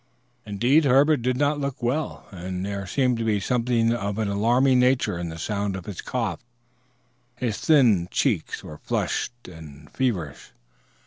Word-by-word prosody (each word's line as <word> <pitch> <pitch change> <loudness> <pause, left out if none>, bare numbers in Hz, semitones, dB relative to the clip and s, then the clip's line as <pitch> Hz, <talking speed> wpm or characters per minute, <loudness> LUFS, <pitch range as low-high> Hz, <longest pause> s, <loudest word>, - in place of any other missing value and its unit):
Indeed 120 +10 +3
Herbert 140 +2 +4
did 125 +1 0
not 145 +1 +1
look 140 -3 -4
well, 140 +6 -2
and 90 0 -5
there 100 -1 -4
seemed 125 +2 +1
to - - -1
be 110 -2 +1
something 115 +1 +1
of 100 -3 -3
an 110 -2 -1
alarming 120 +6 +3
nature 125 -8 +2
in 85 -1 -4
the 80 - -7
sound 100 +2 -2
of 95 -2 -7
his 100 -4 -6
cough. 115 -8 -3 1.0
His 120 -4 -3
thin 115 - +4
cheeks 110 - -1
were 75 - -10
flushed 120 0 -3
and 80 -5 -12
feverish. 90 - -3
115 Hz, 155 wpm, -24 LUFS, 95-130 Hz, 1.0 s, Herbert